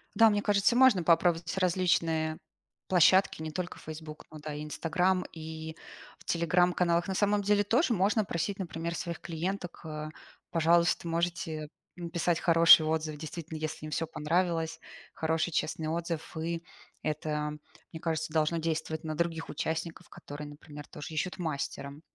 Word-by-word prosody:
Да, 225 Hz, -1 st, +7 dB
мне 205 Hz, -1 st, +1 dB
кажется, 205 Hz, +3 st, +3 dB
можно 250 Hz, -8 st, +6 dB
попробовать 170 Hz, +1 st, +2 dB
различные 165 Hz, -3 st, +1 dB, 0.5 s
площадки, 185 Hz, -1 st, +4 dB
не 155 Hz, 0 st, -5 dB
только 180 Hz, +2 st, -4 dB
"Фейсбук", 155 Hz, 0 st, -9 dB
но 155 Hz, -, -10 dB
да, 150 Hz, 0 st, -6 dB
и 150 Hz, +1 st, -5 dB
"Инстаграм", 180 Hz, +4 st, 0 dB
и 160 Hz, 0 st, -7 dB, 0.4 s
в -, -, -19 dB
телеграм-каналах. 175 Hz, 0 st, +2 dB
На 190 Hz, -, -2 dB
самом 205 Hz, +1 st, +2 dB
деле 205 Hz, +1 st, +3 dB
тоже 235 Hz, -, +2 dB
можно 205 Hz, +2 st, +2 dB
просить, 190 Hz, +3 st, -2 dB
например, 170 Hz, -2 st, -4 dB
своих 170 Hz, -1 st, -4 dB
клиенток 175 Hz, +2 st, -4 dB
э: 155 Hz, -1 st, -5 dB, 0.4 s
"Пожалуйста, 170 Hz, +1 st, +3 dB
можете 165 Hz, -2 st, -2 dB, 0.3 s
написать 170 Hz, 0 st, -1 dB
хороший 165 Hz, -2 st, +8 dB
отзыв". 155 Hz, -1 st, -1 dB
Действительно, 160 Hz, +1 st, -7 dB
если 155 Hz, 0 st, -4 dB
им 155 Hz, -, -7 dB
всё 165 Hz, -, 0 dB
понравилось. 165 Hz, 0 st, 0 dB, 0.3 s
Хороший, 160 Hz, +1 st, 0 dB
честный 160 Hz, 0 st, -1 dB
отзыв. 165 Hz, 0 st, -3 dB
И 165 Hz, +1 st, -3 dB, 0.4 s
это, 150 Hz, 0 st, -2 dB, 0.4 s
мне 160 Hz, -, -7 dB
кажется, 160 Hz, -1 st, -2 dB
должно 155 Hz, +1 st, +2 dB
действовать 160 Hz, 0 st, -2 dB
на 155 Hz, -1 st, -3 dB
других 165 Hz, -1 st, -1 dB
участников, 160 Hz, +3 st, -4 dB
которые, 150 Hz, -3 st, -9 dB
например, 145 Hz, 0 st, -11 dB
тоже 150 Hz, +2 st, -8 dB
ищут 180 Hz, +5 st, -2 dB
мастера. 140 Hz, -3 st, -4 dB
165 Hz, 145 wpm, -30 LUFS, 155-175 Hz, 0.5 s, хороший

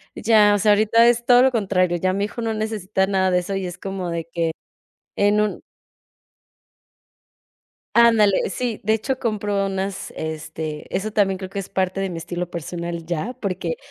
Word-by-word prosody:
ya, 215 Hz, -2 st, +4 dB
o -, -, 0 dB
sea, 210 Hz, +1 st, +5 dB
ahorita 220 Hz, +3 st, +4 dB
es 240 Hz, 0 st, +2 dB
todo 245 Hz, 0 st, +6 dB
lo 265 Hz, -, +4 dB
contrario, 185 Hz, -6 st, +1 dB
ya 185 Hz, +2 st, 0 dB
mi 200 Hz, +1 st, 0 dB
hijo 225 Hz, +3 st, -6 dB
no 225 Hz, -1 st, -1 dB
necesita 215 Hz, -3 st, -1 dB
nada 190 Hz, -1 st, +1 dB
de 180 Hz, -, +3 dB
eso, 185 Hz, +2 st, -4 dB
y 195 Hz, -1 st, -2 dB
es 175 Hz, 0 st, -7 dB
como 190 Hz, -2 st, -4 dB
de 165 Hz, -1 st, -3 dB
que 165 Hz, -1 st, 0 dB, 0.7 s
en 205 Hz, +1 st, +3 dB
un 210 Hz, -1 st, -2 dB, 2.4 s
Ándale, 225 Hz, -5 st, +4 dB
sí, 235 Hz, +3 st, -3 dB
de 215 Hz, +2 st, +1 dB
hecho, 260 Hz, +4 st, -2 dB
compro 205 Hz, -3 st, -1 dB
unas, 195 Hz, 0 st, -4 dB
este, 155 Hz, -1 st, -5 dB
eso 205 Hz, +3 st, -2 dB
también 195 Hz, -3 st, +2 dB
creo 190 Hz, 0 st, -6 dB
que 200 Hz, +1 st, -4 dB
es 195 Hz, -, -8 dB
parte 185 Hz, 0 st, -1 dB
de 195 Hz, -1 st, -2 dB
mi 175 Hz, -, -5 dB
estilo 175 Hz, +1 st, -5 dB
personal 170 Hz, 0 st, -5 dB
ya, 175 Hz, +9 st, -3 dB
porque 185 Hz, -6 st, -3 dB
195 Hz, 180 wpm, -22 LUFS, 180-215 Hz, 2.4 s, todo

